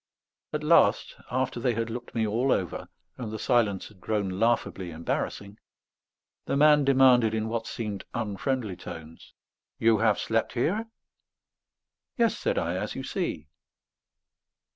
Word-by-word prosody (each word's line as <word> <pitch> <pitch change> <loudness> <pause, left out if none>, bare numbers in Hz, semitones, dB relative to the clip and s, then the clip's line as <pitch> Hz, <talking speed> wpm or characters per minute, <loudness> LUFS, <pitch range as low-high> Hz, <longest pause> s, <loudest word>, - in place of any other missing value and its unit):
At - - -3
last, - - +4
after 130 0 -1
they 120 -1 +1
had 115 0 -2
looked 120 +1 -7
me 110 -1 +1
all 120 +5 +1
over, 90 -4 -1 0.3
and 115 -4 -5
the 110 - -4
silence 110 -5 +1
had 100 -4 -20
grown 105 -2 -1
laughably 115 -5 0
embarrassing, 100 +5 -4 0.9
the 140 - 0
man 150 0 +6
demanded 130 -5 +5
in 110 0 -1
what 115 0 -3
seemed 105 -4 -5
unfriendly 110 0 -2
tones: 80 -2 -10 0.4
"You 110 -2 +3
have 110 -1 +3
slept 115 0 -1
here?" 200 - 0 1.3
"Yes," 230 -2 +3
said - - -1
I. - - -1
"As - - -4
you - - -5
see." - - -3
115 Hz, 140 wpm, -27 LUFS, 105-130 Hz, 1.3 s, man